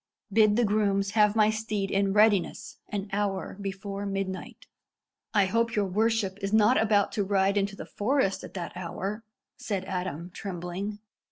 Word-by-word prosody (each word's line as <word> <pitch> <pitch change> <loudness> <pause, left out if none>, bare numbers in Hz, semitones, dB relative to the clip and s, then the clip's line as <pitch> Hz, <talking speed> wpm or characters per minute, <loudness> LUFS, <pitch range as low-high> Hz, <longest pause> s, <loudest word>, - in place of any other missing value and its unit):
Bid 215 -1 +5
the 240 +1 +3
grooms 200 -1 +1
have 210 0 +4
my 215 -1 +4
steed 215 -2 -2
in 195 0 +2
readiness 205 -2 +2
an 205 -1 -3
hour 200 -2 -1
before 195 0 -5
midnight." 195 -1 -4 0.7
"I 205 -3 +4
hope 230 +4 0
your 205 -1 +2
worship 205 0 0
is 195 0 -2
not 220 +3 +5
about 205 -2 +3
to 210 - 0
ride 195 0 +2
into 200 0 0
the - - -7
forest 220 -2 0
at - - -10
that 175 -1 -5
hour?" 195 +5 -4 0.3
said 200 -6 -3
Adam, 180 -2 -4
trembling. 185 +2 -5
200 Hz, 160 wpm, -28 LUFS, 195-215 Hz, 0.7 s, Bid